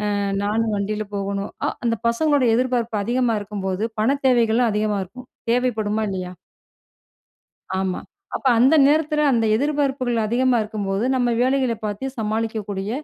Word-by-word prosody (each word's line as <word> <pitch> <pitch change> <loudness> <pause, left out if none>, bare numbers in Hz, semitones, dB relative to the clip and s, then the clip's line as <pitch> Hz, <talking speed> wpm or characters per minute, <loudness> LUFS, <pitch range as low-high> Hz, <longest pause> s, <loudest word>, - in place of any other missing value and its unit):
அ - - 0 0.3
நானும் 220 +2 0
வண்டில 210 +1 -2
போகணும். 200 0 -3 0.2
அ - - +1 0.2
அந்த 230 -1 +2
பசங்களோட 285 +2 +2
எதிர்பார்ப்பு 240 -2 0
அதிகமா 240 +1 +1
இருக்கும்போது, 195 -1 -3 0.2
பணத் 275 +5 +1
தேவைகளும் 235 -1 +3
அதிகமா 210 -1 0
இருக்கும். 250 +7 -13 0.2
தேவைப்படுமா! 220 -3 0
இல்லயா! 185 -2 -4 1.5
ஆமா. 190 -1 -1 0.4
அப்ப - - -1
அந்த 265 +6 +5
நேரத்தில 300 0 +2
அந்த 230 -2 +2
எதிர்பார்ப்புகள் 270 -2 0
அதிகமா 245 +3 +2
இருக்கும்போது, 210 -1 -2
நம்ம 245 -1 +1
வேலைகள 260 -1 +2
பார்த்து 210 +4 -4
சமாளிக்கக்கூடிய 215 -2 -2
225 Hz, 130 wpm, -22 LUFS, 205-255 Hz, 1.5 s, அந்த